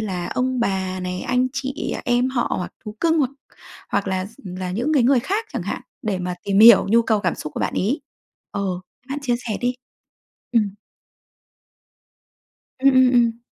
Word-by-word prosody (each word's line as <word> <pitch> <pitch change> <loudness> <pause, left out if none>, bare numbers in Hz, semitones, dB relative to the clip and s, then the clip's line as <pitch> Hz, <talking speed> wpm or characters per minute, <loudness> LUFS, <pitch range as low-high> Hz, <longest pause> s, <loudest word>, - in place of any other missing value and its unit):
là 185 -5 -3
ông 255 -1 -1
bà 190 -3 -1
này, 180 0 -3
anh 250 0 +1
chị 275 +1 -3
em 245 +1 +2
họ 245 -2 0
hoặc 180 - -5
thú 210 0 -7
cưng, 325 -1 +3
hoặc 265 -3 +2 0.6
hoặc - - -1
là 190 0 -1
s 220 - -16
ừm, 185 -1 -7
là 185 -1 -4
những 240 +11 -1
cái 275 - +4
người 255 +1 +4
khác 410 - -2
chẳng - - -3
hạn - - -4 0.2
để 210 -6 -1
mà 180 0 -3
tìm 200 -1 +1
hiểu 230 -2 +9
nhu 230 +3 +5
cầu 220 -2 +1
cảm 180 -4 0
xúc 150 - -7
của - - -3
bạn - - -1
ấy? 230 +11 0 0.5
Ờ, 200 - -3 0.5
bạn 275 +2 -3
chia 245 -3 +1
sẻ 230 -4 -4
đi. 250 0 0 0.8
Ừm. 210 -5 +1 2.0
Ừm, 270 - +4
ừm, 255 -1 +6
ừm. 235 -1 +2
230 Hz, 190 wpm, -22 LUFS, 190-255 Hz, 2.0 s, hiểu